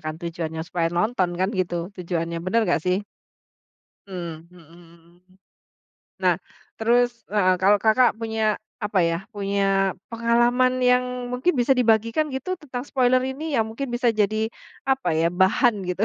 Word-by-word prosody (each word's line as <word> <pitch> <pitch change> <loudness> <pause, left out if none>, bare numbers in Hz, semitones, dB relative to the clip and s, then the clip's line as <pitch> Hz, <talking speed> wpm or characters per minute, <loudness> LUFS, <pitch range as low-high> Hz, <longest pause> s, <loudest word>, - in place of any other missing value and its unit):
kan 155 0 -4
tujuannya, 165 -2 -4
supaya 170 -2 -1
nonton 180 +2 0
kan 185 +2 +1
gitu 175 -1 -2
tujuannya. 170 -2 -3
Benar 185 +7 +1
nggak 160 - +1
sih? 185 +3 0 1.0
Mmm, 170 -3 -7
mhm, 180 - -16
mhm. 170 0 -19 1.1
Nah, - - +4 0.4
terus, 240 +1 +1
heeh, 190 -3 +3
kalau 200 +2 +5
Kakak 235 +3 +4
punya, 220 -1 -1 0.2
apa 210 -4 0
ya, 165 - 0 0.2
punya 195 -1 +1 0.2
pengalaman 240 +2 +2
yang 250 0 +4 0.3
mungkin 255 +9 +1
bisa 245 +3 +4
dibagikan 230 +5 +2
gitu 265 +8 -3
tentang 255 -5 -6
spoiler 255 -1 +3
ini, 280 +3 -3
yang 225 - +3
mungkin 265 +5 -5
bisa 240 0 +1
jadi, 215 +2 +1 0.4
apa 265 0 +1
ya, 165 +1 +2
bahan 230 +5 +4
gitu? 185 +4 0
210 Hz, 145 wpm, -23 LUFS, 175-245 Hz, 1.1 s, kalau